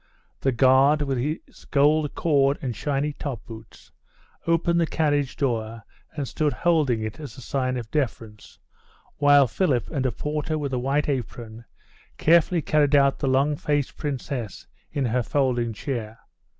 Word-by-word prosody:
The 135 - +1
guard, 135 +4 +4
with 135 -3 -1
his 150 +6 -5
gold 150 +1 +2
cord 140 -3 +2
and 125 -4 -4
shiny 145 +4 -1
top 135 -7 -6
boots, 110 -1 -13 0.6
opened 170 +1 +2
the 165 - +1
carriage 145 -4 0
door 115 -4 -2 0.3
and 140 -2 -2
stood 150 +1 -1
holding 150 -10 +1
it 110 +4 -5
as 145 -7 -9
a - - -10
sign 130 0 -1
of 115 -3 -7
deference, 115 -7 -4 0.6
while 145 -1 +6
Philip 130 - 0
and 135 -5 0
a - - -1
porter 150 +3 -3
with 140 -3 -3
a 125 - 0
white 140 +4 0
apron 120 -4 -5 0.5
carefully 170 0 +3
carried 150 -2 +3
out 140 -1 +3
the 140 - -1
long 135 +3 +2
faced 145 -1 -1
Princess 130 - -5 0.3
in 140 -2 -1
her 125 +1 +1
folding 125 -3 0
chair. 115 -1 -5
140 Hz, 155 wpm, -24 LUFS, 120-150 Hz, 0.6 s, while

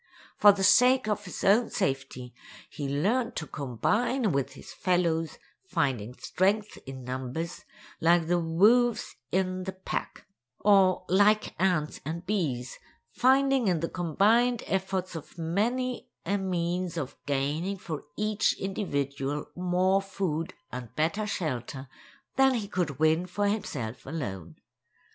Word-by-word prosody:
For 205 - +8
the 195 -1 -2
sake 250 +3 +5
of 210 -1 -1
his 180 - -7
own 215 +5 +4
safety, 135 -2 -3 0.4
he 140 -2 -4
learned 215 - 0
to 160 - -3
combine 210 - 0
with 140 -3 -1
his - - -11
fellows, 170 -3 0 0.3
finding 125 - -1
strength 205 +4 0
in 130 -1 -7
numbers, 130 +7 -5 0.3
like 170 0 +4
the 175 +2 +2
wolves 215 +8 +3 0.2
in 185 0 0
the 190 - -4
pack; 190 +1 -5 0.3
or, 195 -3 +4
like 205 +3 +3
ants 175 -5 +1
and 165 +4 -5
bees, 145 - -2 0.3
finding 265 - +3
in 175 -3 +2
the 165 - -1
combined 220 +8 +2
efforts 190 -1 -2
of 165 +2 -9
many 230 +10 -1 0.2
a 200 +4 0
means 180 -1 -2
of 140 -5 -4
gaining 145 +8 -1
for 165 -5 -6
each 210 0 +1
individual 145 -7 -2
more 185 +2 +2
food 185 -4 -3 0.2
and 125 -2 -7
better 185 +8 0
shelter 135 - -3 0.5
than 270 -1 +5
he 215 -4 -2
could 175 -9 -2
win 160 +4 +2
for 205 +3 -1
himself 135 - -3
alone. 95 - -5
180 Hz, 130 wpm, -28 LUFS, 150-205 Hz, 0.5 s, For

